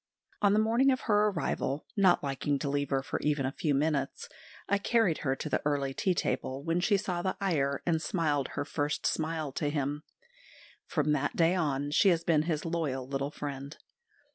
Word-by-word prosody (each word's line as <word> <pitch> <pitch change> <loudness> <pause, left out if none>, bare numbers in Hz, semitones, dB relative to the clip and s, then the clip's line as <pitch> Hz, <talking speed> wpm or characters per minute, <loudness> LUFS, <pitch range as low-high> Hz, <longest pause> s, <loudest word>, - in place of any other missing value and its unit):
On 205 -1 +4
the - - +3
morning 230 +5 +3
of 260 -1 +1
her 210 -2 +3
arrival, 155 -6 -2
not 190 -6 +4
liking 140 +1 -1
to 140 - -3
leave 140 0 -1
her 135 -1 0 0.2
even 150 -2 +1
for - - 0
a - - -12
few 150 -4 0
minutes, 140 -1 -1 0.4
I 200 0 +2
carried 210 -6 +2
her 135 -2 0
to 145 - -5
the - - 0
early 140 -2 0
tea 185 +6 0
table, 135 -4 -2
when 165 +2 0
she 200 +3 +3
saw 180 -3 -2
the 185 +1 -2
Iyer 140 -8 0
and 160 -2 +1
smiled 150 -6 0
her 145 - -1
first 145 -1 -2
smile 160 -2 -1
to 145 +2 -1
him. 145 0 -2 0.9
From 150 -3 0
that 145 -1 0
day 165 +1 +4
on 145 -5 -1
she 195 +6 +5
has 170 -2 +2
been 160 -3 +3
his 155 -1 -2
loyal 150 -6 -2
little 140 +1 -2
friend. 140 -1 -6
150 Hz, 195 wpm, -30 LUFS, 140-175 Hz, 0.9 s, she